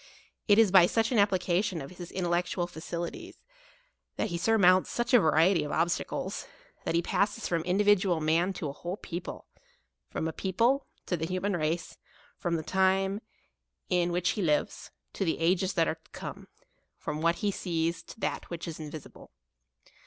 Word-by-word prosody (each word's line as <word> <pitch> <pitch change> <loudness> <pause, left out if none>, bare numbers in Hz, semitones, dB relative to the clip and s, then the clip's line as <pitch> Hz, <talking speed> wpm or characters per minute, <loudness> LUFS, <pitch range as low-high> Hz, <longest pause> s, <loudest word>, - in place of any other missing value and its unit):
It 205 -2 +6
is 225 -4 +6
by 185 -2 +8
such 225 +4 +1
an 235 - +3
application 185 -2 +2
of 135 +1 -8
his 175 -1 -9
in 185 - -3
tellectual 175 0 0
faculties, 170 0 -6 0.8
that - - -1
he 170 - -2
surmounts 185 -3 +4
such 240 +1 -2
a 245 - +9
variety 165 0 +4
of 150 - -5
obstacles; 170 +2 -1 0.4
that - - 0
he 170 - +2
passes 210 +5 0
from 170 -2 0
in 180 +1 +1
dividual 200 -4 +3
man 165 +4 +2
to 170 -4 -4
an - - -6
whole 175 +3 -4
people; 175 -3 -6 0.6
from 160 - -2
a 160 - -3
people, 230 - +1 0.2
to 180 - 0
the 160 -1 -3
human 185 +2 -1
race; 160 +1 -2 0.4
from 175 -1 -1
the 160 - -2
time 190 +3 +2 0.7
in 175 -1 +2
which 175 0 +1
he 210 - -3
lives, 150 -5 0 0.2
to - - -2
the 165 - 0
ages 180 +3 +1
that 165 -2 +2
are - - +1
to - - -27
come; - - -8 0.5
from 150 +1 -4
what 170 +1 +3
he 205 -1 0
sees 165 -2 -1
to - - -13
that - - -3
which 170 -1 -5
is 165 -1 -6
invisible. 155 -1 -9
175 Hz, 180 wpm, -29 LUFS, 165-195 Hz, 0.8 s, a